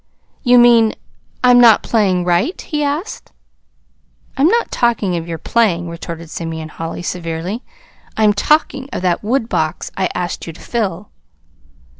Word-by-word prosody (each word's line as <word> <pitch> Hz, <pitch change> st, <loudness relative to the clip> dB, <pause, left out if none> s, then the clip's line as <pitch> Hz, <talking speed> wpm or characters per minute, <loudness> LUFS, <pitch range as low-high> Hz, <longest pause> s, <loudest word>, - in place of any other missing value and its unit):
"You 245 Hz, -1 st, +5 dB
mean 235 Hz, -2 st, +5 dB, 0.5 s
I'm 245 Hz, -1 st, +6 dB
not 230 Hz, -3 st, +6 dB
playing 190 Hz, -6 st, +1 dB
right?" 180 Hz, -, +1 dB
he 300 Hz, -2 st, -3 dB
asked. 295 Hz, +8 st, -4 dB, 1.0 s
"I'm 280 Hz, +3 st, +3 dB
not 470 Hz, +6 st, +1 dB
talking 225 Hz, -6 st, +1 dB
of 165 Hz, 0 st, -4 dB
your 165 Hz, -1 st, -4 dB
playing," 175 Hz, -3 st, 0 dB
retorted 170 Hz, -1 st, -8 dB
Simeon 160 Hz, -1 st, -5 dB
Holly 165 Hz, +2 st, -6 dB
severely. 175 Hz, +5 st, -4 dB, 0.6 s
"I'm 215 Hz, -1 st, +4 dB
talking 280 Hz, +2 st, +1 dB
of -, -, -4 dB
that 180 Hz, -2 st, +1 dB
woodbox 210 Hz, -, -1 dB
I 190 Hz, -2 st, 0 dB
asked 175 Hz, -1 st, -4 dB
you 165 Hz, -, -6 dB
to -, -, -16 dB
fill." 205 Hz, -5 st, -3 dB
200 Hz, 140 wpm, -17 LUFS, 170-240 Hz, 1.0 s, I'm